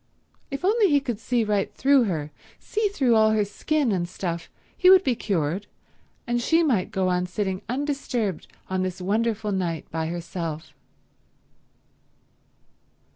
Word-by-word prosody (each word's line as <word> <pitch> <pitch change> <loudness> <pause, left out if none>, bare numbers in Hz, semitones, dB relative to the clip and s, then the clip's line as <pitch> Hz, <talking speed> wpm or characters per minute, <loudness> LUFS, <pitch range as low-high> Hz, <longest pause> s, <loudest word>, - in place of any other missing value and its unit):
If 275 +4 -4
only 420 0 +4
he 290 -2 +4
could 240 -6 -4
see 240 0 0
right 210 -2 0
through 275 -2 +4
her, 155 -6 -3 0.3
see 430 0 -1
through 275 - +2
all 220 0 +5
her 210 -1 +2
skin 275 +6 0
and 175 -3 -1
stuff, 170 -2 -4 0.3
he 365 - +5
would 380 0 +8
be 260 - +2
cured, 190 -2 -1 0.6
and 240 0 0
she 325 +7 +3
might 230 - +1
go 190 -4 0
on 180 0 0
sitting 190 0 -2
undisturbed 250 - -2 0.2
on 185 0 -1
this 185 0 -3
wonderful 215 +2 0
night 175 -5 -2
by 160 0 -2
herself. 165 -2 -5
210 Hz, 145 wpm, -25 LUFS, 180-265 Hz, 0.6 s, would